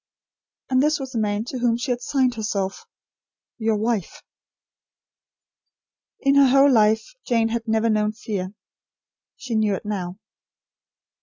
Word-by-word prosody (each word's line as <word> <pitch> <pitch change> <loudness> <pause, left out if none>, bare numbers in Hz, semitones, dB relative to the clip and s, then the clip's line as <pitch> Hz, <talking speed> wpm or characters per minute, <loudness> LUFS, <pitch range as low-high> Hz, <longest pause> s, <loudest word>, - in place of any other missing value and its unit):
And 255 0 +4
this 300 +1 +2
was 265 -1 -6
the 230 - -2
man 210 0 -1
to 255 +1 -5
whom 235 -1 +2
she 250 +2 -3
had 245 0 -2
signed 260 -1 +1
herself: 210 - -3 0.7
"Your 220 -1 +1
wife." 215 -3 -2 2.0
In 275 -1 +3
her 280 -1 +6
whole 275 +2 +5
life, 220 - +3
Jane 230 -2 +1
had 230 0 -3
never 220 +1 +1
known 215 -1 +1
fear. 205 -4 -5 0.8
She 255 - -6
knew 215 -2 +2
it 190 - -8
now. 190 -3 -4
225 Hz, 140 wpm, -23 LUFS, 210-255 Hz, 2.0 s, her